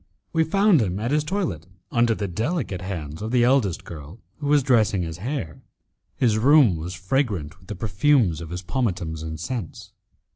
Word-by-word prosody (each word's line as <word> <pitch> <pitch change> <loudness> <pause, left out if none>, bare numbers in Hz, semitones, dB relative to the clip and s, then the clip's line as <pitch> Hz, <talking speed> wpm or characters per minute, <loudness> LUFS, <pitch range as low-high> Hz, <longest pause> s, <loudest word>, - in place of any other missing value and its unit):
We 165 -1 +3
found 195 - +4
him 95 -2 -1
at 115 +4 -2
his 150 0 +2
toilet 155 - -3 0.2
under 120 -1 +3
the 100 - -3
delicate 110 - -2
hands 80 -5 -5
of 110 - -3
the 125 0 +3
eldest 120 -8 +2
girl, 80 +5 -10 0.2
who 145 - -4
was 145 -1 +4
dressing 110 -8 +3
his 80 0 -6
hair. 115 - -4 0.5
His 110 -4 +2
room, 135 - +6
was 85 +3 -5
fragrant 95 - -1
with 90 - -21
the 105 - -5
perfumes 105 - +2
of 80 - -7
his 90 +2 -5
pomatums 90 - -2
and 80 -1 -6
scents. 110 -2 -5
105 Hz, 180 wpm, -24 LUFS, 85-135 Hz, 0.5 s, room